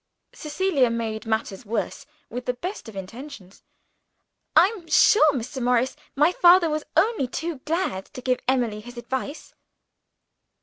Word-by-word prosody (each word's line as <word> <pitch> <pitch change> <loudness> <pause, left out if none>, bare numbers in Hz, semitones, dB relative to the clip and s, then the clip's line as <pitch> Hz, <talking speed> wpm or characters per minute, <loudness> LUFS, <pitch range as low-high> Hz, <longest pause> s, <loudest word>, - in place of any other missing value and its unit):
Cecilia 300 -4 +1
made 225 -1 -3
matters 220 -1 -2
worse 230 +5 -4 0.2
with 245 +1 -6
the 250 - 0
best 355 - -6
intentions. 205 +1 -10 0.9
"I'm 365 +1 +4
sure, 310 -2 +6
Mr. 260 +2 -4
Morris, 250 +1 +1 0.2
my 300 +5 +4
father 350 -2 +5
was 305 0 -2
only 440 - +2
too 320 +3 -4
glad 305 - -1
to 255 - -6
give 255 0 +1
Emily 240 -5 +1
his 245 +3 -12
advice." 265 +5 -5
260 Hz, 130 wpm, -24 LUFS, 230-315 Hz, 0.9 s, sure